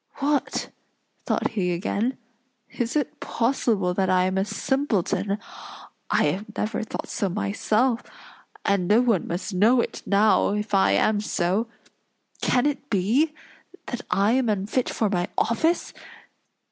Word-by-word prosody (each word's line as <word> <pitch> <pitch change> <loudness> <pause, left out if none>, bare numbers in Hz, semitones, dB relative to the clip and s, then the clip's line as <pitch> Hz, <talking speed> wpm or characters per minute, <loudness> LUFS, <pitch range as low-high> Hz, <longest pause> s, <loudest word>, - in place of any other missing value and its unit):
"What!" 285 0 -1 0.6
thought - - +1
he 185 -5 -1
again. 215 +7 -1 0.5
"Is 240 +2 -3
it 290 -4 -1
possible 230 -6 0
that 190 0 0
I 185 -1 +4
am 185 +1 0
a 190 - +2
simpleton? 210 -5 0 0.7
I - - +3
have 205 +4 -1
never 215 +2 -1
thought 220 - -5
so 200 -5 -1
myself; 215 +5 0 0.6
and 200 -3 +1
no 210 +4 +5
one 230 -8 +1
must 185 +4 -4
know 220 +7 +4
it - - -2
now 205 0 +3
if 210 0 -4
I 195 - +4
am 210 -1 +2
so. 200 +2 0 0.7
Can 250 +1 +2
it 290 -1 -2
be, 245 - +2 0.5
that 245 -1 -4
I 200 +3 +3
am 255 -1 +2
unfit 210 +5 0
for 220 - 0
my 180 -3 0
office? 320 +10 +1
215 Hz, 140 wpm, -24 LUFS, 195-245 Hz, 0.7 s, no